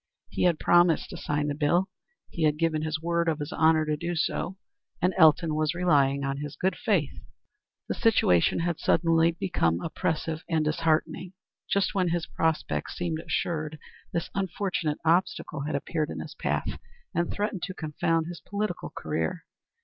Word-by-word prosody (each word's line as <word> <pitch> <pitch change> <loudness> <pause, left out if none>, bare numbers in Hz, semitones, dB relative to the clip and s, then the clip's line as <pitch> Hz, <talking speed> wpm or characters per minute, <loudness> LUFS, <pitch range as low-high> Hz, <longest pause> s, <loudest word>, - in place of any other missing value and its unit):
He - - 0
had 170 -3 +3
promised 175 -1 +3
to - - -6
sign 150 0 -1
the 145 - 0
bill. 160 +6 +2 0.4
He 170 - -5
had 150 -1 +3
given 160 -1 +1
his 155 0 -2
word 170 +1 0
of 155 -1 -1
honor 160 -1 +3
to 150 0 0
do 170 +3 -3
so, 170 +3 -1 0.4
and 180 +1 +2
Elton 160 -1 +5
was 155 0 0
relying 140 -6 +3
on 135 0 -1
his 145 0 -6
good 190 +4 0
faith. - - 0 0.7
The - - -1
situation 170 - +3
had 170 -1 -1
become - - -13
suddenly 165 0 +3 0.5
oppressive 160 0 -2
and 160 -2 +1
disheartening. 160 +3 0 0.4
Just 200 -1 +1
when 185 -2 +1
his 170 -1 0
prospects 160 -1 -1
seemed 170 -3 -2
assured 155 -2 -2 0.3
this 170 0 -3
unfortunate 185 -5 -1
obstacle 160 -4 +1
had 150 - -2
appeared 155 +2 -2
in - - -5
his - - -7
path, - - -2 0.3
and 170 0 0
threatened 205 -3 -2
to 185 - -7
confound 160 +1 0
his 175 +1 -7
political 210 +1 -3
career. - - -3
165 Hz, 165 wpm, -27 LUFS, 155-175 Hz, 0.7 s, Elton